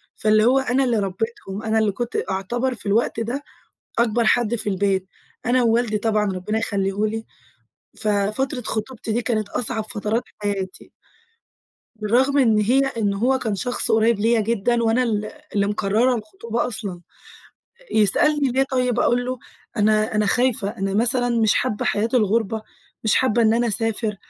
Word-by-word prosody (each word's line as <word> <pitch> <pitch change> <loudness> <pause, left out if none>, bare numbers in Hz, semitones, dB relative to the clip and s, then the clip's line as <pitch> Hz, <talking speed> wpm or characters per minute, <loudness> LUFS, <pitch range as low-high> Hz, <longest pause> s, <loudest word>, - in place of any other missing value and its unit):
فاللي 215 0 +3
هو 260 +2 +4
أنا 265 0 +1
اللي 235 -4 +1
ربّيتهم، 200 +1 -4
أنا 220 0 +1
اللي 215 -2 +2
كنت 240 +4 -4
أعتبر 240 +7 -1
في - - -12
الوقت 220 +2 +1
ده 245 +6 -3 0.6
أكبر 235 0 +2
حد 240 0 +2
في 210 -2 -2
البيت، 190 -1 0 0.4
أنا 250 +1 +3
ووالدي 230 -2 +2
طبعًا 215 -1 +1
ربِّنا 185 +4 -2
يخليه 200 -1 -1
لي. 225 +1 -4 0.7
ففترة 215 +6 -1
خطوبتي 225 +1 -4
دي 240 +2 0
كانت 215 -3 -1
أصعب 220 -2 -2
فترات 215 +2 -1 0.2
حياتي. 195 -2 -4 1.0
بالرغم 245 +7 +2
إن 225 -5 +4
هي 245 +6 +3
إن 220 -6 -1
هو 255 +6 +1
كان 220 -5 -2
شخص 245 +5 -1
قُريب 220 -1 +3
ليّا 225 +1 +3
جدًا 235 +2 0
وأنا 230 +3 +2
ال 215 -3 -1 0.3
اللي 200 -1 +2
مقرَّرة 215 +5 +1
الخطوبة 225 +2 -3
أصلًا. 200 -6 -5 0.9
يسألني: 275 +7 +3
"ليه 265 +2 +3
طيب؟" 250 -2 0
أقول 245 +1 +2
له: 255 -1 -3 0.4
"أنا 215 +1 +2
أنا 210 0 +2
خايفة، 235 -4 +1
أنا 195 0 -2
مثلًا 245 +3 +2
مش 220 - +4
حابّة 230 -5 -1
حياة 220 +3 +1
الغُربة، 220 -1 +1 0.4
مش 220 - +3
حابّة 240 -2 +2
إن 220 0 +4
أنا 240 +1 +1
أسافر. 220 0 -1
225 Hz, 160 wpm, -22 LUFS, 210-245 Hz, 1.0 s, هو